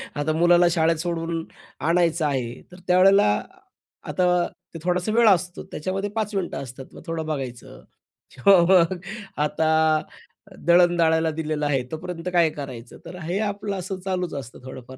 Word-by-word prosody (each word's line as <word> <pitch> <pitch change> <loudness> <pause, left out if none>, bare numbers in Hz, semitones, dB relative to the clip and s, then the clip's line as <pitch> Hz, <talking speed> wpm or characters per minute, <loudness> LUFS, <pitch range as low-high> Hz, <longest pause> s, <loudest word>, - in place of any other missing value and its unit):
आता 145 +2 -1
मुलाला 175 +1 +5
शाळेत 165 -1 +2
सोडून 165 -1 -3 0.4
आणायचं 165 -1 +1
आहे, 125 -4 -2
तर 180 - -13
त्यावेळेला 185 - +5 0.8
आता 180 -1 +2 0.3
ते 165 - -7
थोडासा 180 +3 0
वेळ 230 -1 +5
असतो, 180 -1 +1
त्याच्यामध्ये 195 +5 -3
5 215 -2 -2
मिनिटं 190 -2 -2
असतात, 130 +1 -10
मग - - -11
थोडं 165 -1 -3
बघायचं. 130 -6 -6 0.5
किंवा 185 +8 +5
मग 185 -1 +5 0.5
आता 155 +1 0 1.0
दळण 175 0 +5
दळायला 160 -1 +3
दिलेलं 155 -1 -3
आहे, 135 -3 +1
तोपर्यंत 175 +2 -5
काय 170 -2 +4
करायचं? 130 -5 -8
तर 180 - -9
हे 180 +5 -2
आपलं 200 0 -4
असं 185 +1 -5
चालूच 180 -3 -2
असतं, 135 -3 -7
थोडंफार, 130 0 -10
170 Hz, 150 wpm, -23 LUFS, 150-180 Hz, 1.0 s, मुलाला